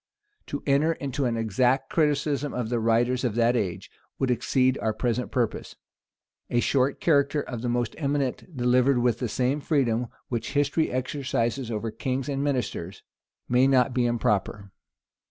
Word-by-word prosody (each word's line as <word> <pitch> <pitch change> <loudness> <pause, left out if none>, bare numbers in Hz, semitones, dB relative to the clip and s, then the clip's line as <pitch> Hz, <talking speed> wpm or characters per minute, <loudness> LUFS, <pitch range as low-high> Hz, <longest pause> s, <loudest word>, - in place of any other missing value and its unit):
To 145 - -5
enter 145 +4 +3
into 140 -2 -3
an 120 -2 0
exact 125 +5 +1
criticism 145 -2 0
of 120 -3 -2
the 120 -1 0
writers 120 +3 +1
of 120 -4 -1
that 120 +1 +3
age, 100 -7 -3 0.3
would 130 -2 0
exceed 130 +2 +1
our 110 - 0
present 120 +1 -1
purpose. 120 -4 -2 0.7
A 120 - +2
short 135 +2 +1
character 145 -2 +2
of 125 -5 -5
the 120 - -2
most 120 -1 -1
eminent, 140 +2 -2
delivered 125 +2 +3
with 120 -2 +1
the 125 - -2
same 130 +6 0
freedom 125 -6 +1 0.2
which 120 +2 -3
history 145 +2 +1
exercises 130 -2 -2
over 110 0 -3
kings 130 +4 -3
and 140 0 -1
ministers, 125 -10 -3 0.4
may 125 +2 +4
not 130 -1 +3
be 120 -1 +2
improper. 105 -3 -1
125 Hz, 155 wpm, -26 LUFS, 120-140 Hz, 0.7 s, may